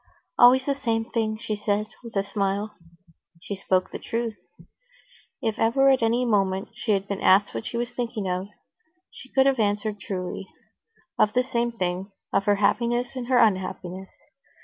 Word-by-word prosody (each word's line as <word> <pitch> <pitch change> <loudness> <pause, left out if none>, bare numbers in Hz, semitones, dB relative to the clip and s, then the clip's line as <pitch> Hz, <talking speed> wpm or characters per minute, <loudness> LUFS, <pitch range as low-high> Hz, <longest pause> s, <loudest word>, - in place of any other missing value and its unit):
"Always 255 +2 +7
the 280 - +1
same 230 -5 -1
thing," 220 -2 0
she 220 -2 -3
said, 205 0 0 0.2
with 230 -2 -10
a 195 - +2
smile. 200 +1 -2 0.7
She 200 - -5
spoke 185 -1 0
the - - -6
truth. 230 -1 -3 1.1
If 220 -2 -1
ever 270 +5 +4
at 265 - +2
any 235 +2 +2
moment 195 -2 +1
she 235 -2 -1
had 195 0 -1
been 200 -1 -4
asked 195 +2 +4
what - - -4
she 235 - -4
was 240 +1 -2
thinking 230 -5 -3
of, 180 +1 -2 0.6
she 255 - -13
could 265 0 +3
have 270 -2 +3
answered 210 0 0
truly: 190 0 -5 0.7
of 210 - +4
the 250 - +3
same 240 -2 -1
thing, 185 -2 -3 0.2
of 195 - +2
her 205 -1 +4
happiness 240 +5 +1
and 250 -2 -4
her 255 -1 +3
unhappiness. 190 -3 0
215 Hz, 170 wpm, -25 LUFS, 195-240 Hz, 1.1 s, Always